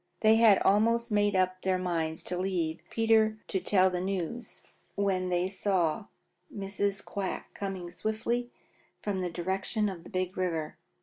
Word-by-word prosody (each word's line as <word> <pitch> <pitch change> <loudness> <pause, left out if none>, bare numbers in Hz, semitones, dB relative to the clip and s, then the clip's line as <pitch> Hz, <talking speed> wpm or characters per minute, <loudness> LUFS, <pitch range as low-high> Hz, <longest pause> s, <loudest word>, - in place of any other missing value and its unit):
They 220 0 +6
had 225 -4 +7
almost 230 +4 +3
made 205 -1 +2
up 185 0 +1
their 190 -1 +1
minds 165 -3 -2
to 180 - -2
leave 175 -3 -1
Peter 220 -1 +3
to 190 - 0
tell 185 0 +3
the 180 -1 -2
news 195 +4 -4 0.3
when 190 -2 0
they 180 0 +1
saw 190 -1 0 0.4
Mrs. 200 0 -2
Quack 195 -2 -4
coming 190 -3 -5
swiftly 220 +6 -2 0.5
from 200 -3 -1
the 180 - -1
direction 190 +5 -1
of 175 -4 -7
the - - -12
Big 185 -2 -2
River. 165 -4 -2
190 Hz, 150 wpm, -30 LUFS, 180-210 Hz, 0.5 s, had